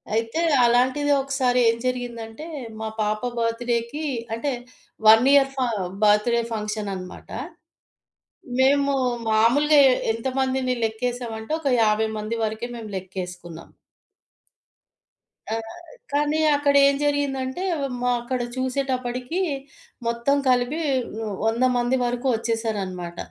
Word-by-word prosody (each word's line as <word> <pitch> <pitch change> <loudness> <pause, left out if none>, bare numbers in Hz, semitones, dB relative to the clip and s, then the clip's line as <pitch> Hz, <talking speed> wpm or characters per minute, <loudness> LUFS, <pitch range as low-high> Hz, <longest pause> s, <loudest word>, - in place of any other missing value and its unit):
అయితే 225 +8 -1 0.2
అలాంటిది 255 +5 +2
ఒకసారి 265 -2 +1
ఏం 230 - +2
జరిగిందంటే 245 +1 -4 0.3
మా 220 - -3
పాప 215 0 0 0.2
బర్త్ 230 +1 -1
డేకి 235 +7 -2 0.3
అంటే 255 +6 -1 0.6
1 225 +4 +8
ఇయర్ 275 -1 +5
ఫ - - -26 0.5
బర్త్‌ 210 +2 +4
డే 235 - +2
ఫంక్షన్ 210 -1 -3
అనమాట, 185 -1 -9 1.3
మేము 280 +1 +4 0.4
మామూలుగా 275 +8 +4
ఎ - - +4 0.2
ఎంతమందిని 260 +2 -1
లెక్కేసామంటే 225 +1 -3
ఒక 285 - -1
50 220 0 +2
మంది 215 +2 -3
వరకే 220 +2 -3
మేం 225 -2 -7
లెక్కేస్కున్నాం. 180 -3 -7 1.8
ఆ! - - +1 0.6
కానీ 295 +2 +1 0.2
అక్కడేం 280 -1 +4
జరిగిందంటే 285 +1 -1 0.4
మా 250 0 +2
అక్కడ 250 +1 -3 0.2
చూసేటప్పడికి 255 +3 -2 0.7
మొత్తం 235 +4 +1
కలిపి 255 +6 +1 0.4
హ్మ్, 215 -2 -3
100 225 +3 +1
మంది 245 +2 +1
వరకు 245 +2 -2
ఒచ్చేసారన్నమాట. 205 -7 -3
240 Hz, 110 wpm, -24 LUFS, 220-270 Hz, 1.8 s, 1